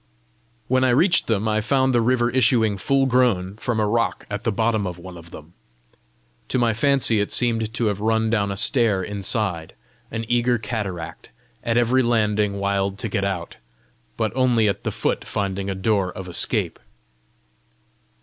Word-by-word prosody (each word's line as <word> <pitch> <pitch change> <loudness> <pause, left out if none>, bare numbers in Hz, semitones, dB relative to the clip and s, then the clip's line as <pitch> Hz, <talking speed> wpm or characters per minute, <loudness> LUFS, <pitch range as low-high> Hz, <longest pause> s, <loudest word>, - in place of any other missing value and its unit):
When 130 +1 +2
I 130 - +3
reached 165 +9 +3
them, 110 -1 0
I 110 0 +1
found 130 +3 +1
the 120 - +3
river 120 0 +1
issuing 115 -4 +3
full 135 +5 +2
grown 115 -7 +1
from 115 0 -2
a 105 - +2
rock 115 +2 -1
at 100 +2 -4
the 115 - 0
bottom 110 -1 0
of 90 -1 -6
one 90 +1 -10
of 85 -1 -12
them. 80 +1 -13 0.9
To - - -1
my 120 -2 +2
fancy 135 -2 +3
it 105 - -1
seemed 115 -3 +1
to 120 - 0
have 105 -2 -1
run 110 0 +1
down 100 -3 +1
a 100 - -4
stair 110 -4 +2
inside, 100 -4 -2 0.3
an 115 0 -4
eager 120 +1 +2
cataract, 105 -7 -5 0.3
at 115 0 0
every 120 +2 +3
landing 105 -4 +1
wild 100 0 -1
to 110 - -3
get 100 - -1
out, 95 -4 -4 0.6
but 110 -1 -1
only 125 -4 +3
at 100 - -2
the - - 0
foot - - -2
finding 100 -1 -3
a 95 - -2
door 95 -1 0
of 95 0 -8
escape. 85 -1 -1
110 Hz, 175 wpm, -22 LUFS, 100-120 Hz, 0.9 s, I